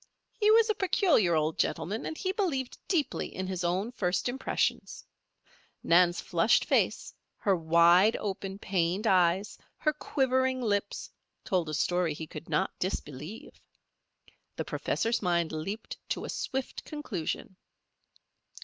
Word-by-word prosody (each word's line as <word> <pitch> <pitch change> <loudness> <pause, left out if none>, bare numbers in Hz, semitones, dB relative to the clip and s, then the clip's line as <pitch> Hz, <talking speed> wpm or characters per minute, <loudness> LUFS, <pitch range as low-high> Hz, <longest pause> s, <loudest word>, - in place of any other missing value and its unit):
He 425 -1 +2
was 450 +1 +6
a 430 - +2
peculiar 355 - +3
old 155 0 0
gentleman, 180 +7 -1
and 315 - -5
he 375 - -1
believed 330 - -1
deeply 305 -8 0
in 190 - -3
his 185 -1 -3
own 185 +6 0
first 185 -5 -1
impressions. 260 +2 -2 0.8
Nan's 175 +1 +4
flushed 175 +6 +2
face, - - +1 0.2
her 195 -2 +2
wide 170 +5 +5
open, 195 -1 -4
pained 185 +1 -1
eyes, 185 0 +2 0.2
her 305 - +1
quivering 260 -2 0
lips, 205 -4 -2 0.3
told 175 -4 0
a 155 - -2
story 175 -1 +1
he 160 - -6
could 155 +1 -10
not 190 - +1
disbelieve. 155 - -5 0.9
The - - -3
professor's 230 +1 -1
mind 170 -4 +1
leaped 180 +8 -5
to - - -2
a - - -7
swift 265 -1 -4
conclusion. 200 - -5
195 Hz, 130 wpm, -29 LUFS, 170-260 Hz, 0.9 s, was